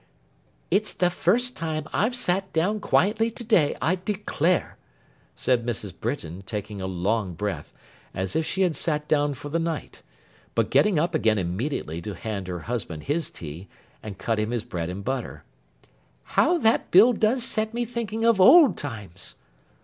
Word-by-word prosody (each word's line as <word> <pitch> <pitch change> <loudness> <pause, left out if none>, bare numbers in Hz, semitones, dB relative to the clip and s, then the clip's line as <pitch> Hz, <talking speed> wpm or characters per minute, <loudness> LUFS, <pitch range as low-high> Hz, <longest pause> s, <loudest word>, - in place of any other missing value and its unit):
'It's 210 +1 +2
the 180 -1 +1
first 245 +9 +2
time 155 -2 -3
I've 225 +6 +1
sat 190 -5 0
down 190 +7 +1
quietly 215 +3 +2
to 230 +1 -5
day, 210 -10 +3
I 165 +7 +1
declare,' 185 -3 -1 0.6
said 125 -2 +1
Mrs. 110 -5 -3
Britain, 95 - -4
taking 105 0 -5
a 95 - -3
long 95 +1 -1
breath, 105 +3 -4 0.4
as 95 0 -3
if 160 - +2
she 190 +4 0
had 175 -4 +1
sat 150 -2 -1
down 145 -2 +1
for 145 +3 -8
the 165 +3 0
night; 165 -1 -4 0.5
but - - +1
getting 210 -5 +4
up 170 +3 +1
again 110 -8 +2
immediately 90 - -3
to 100 +3 -6
hand 100 0 -5
her 90 -2 -4
husband 110 -10 -4
his 155 +3 0
tea, 80 +4 -9 0.3
and 105 -3 -8
cut 115 +1 -1
him 110 0 -1
his 120 -2 -2
bread 90 -8 -4
and 95 +2 -6
butter; 130 -1 -4 0.8
'how 355 - +2
that 225 -8 +2
bill 220 +7 +7
does 225 +3 +1
set 220 -3 -1
me 240 +1 -2
thinking 225 -1 -3
of 230 -5 +4
old 280 - +8
times! 105 - -7
150 Hz, 170 wpm, -25 LUFS, -, 0.8 s, old